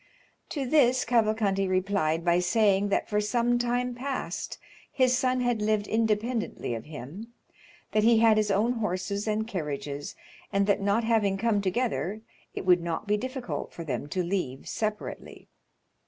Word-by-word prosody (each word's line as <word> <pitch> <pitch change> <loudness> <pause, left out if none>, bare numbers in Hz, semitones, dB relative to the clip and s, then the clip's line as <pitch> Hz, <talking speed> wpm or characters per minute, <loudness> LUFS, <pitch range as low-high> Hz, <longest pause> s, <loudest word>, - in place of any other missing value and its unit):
To 280 -4 -2
this 255 -2 +3
Cavalcanti 215 -4 +2
replied 185 -3 0
by 175 0 +4
saying 200 +1 +2
that - - 0
for 210 0 +1
some 240 +3 +1
time 245 +1 0
past 265 +2 -4 0.3
his 255 -2 +3
son 255 0 +1
had 245 -3 0
lived 210 -1 +1
independently 220 - -1
of 115 - -5
him, 155 - -8 0.6
that 215 - +3
he 230 0 +5
had 220 -1 +5
his 215 -1 +2
own 205 +5 +2
horses 200 -2 -2
and 215 +1 0
carriages, 145 -6 -4 0.4
and 200 0 +2
that 200 0 +2
not 200 +3 +2
having 215 -4 +2
come 215 -1 +1
together, 200 - -1 0.3
it - - -4
would 180 -1 +5
not 170 +2 -3
be 210 - +3
difficult 255 +2 -4
for 170 - -7
them 145 -2 -3
to 180 +4 -1
leave 170 -8 -3
separately. 215 -1 -5
210 Hz, 155 wpm, -28 LUFS, 185-235 Hz, 0.6 s, he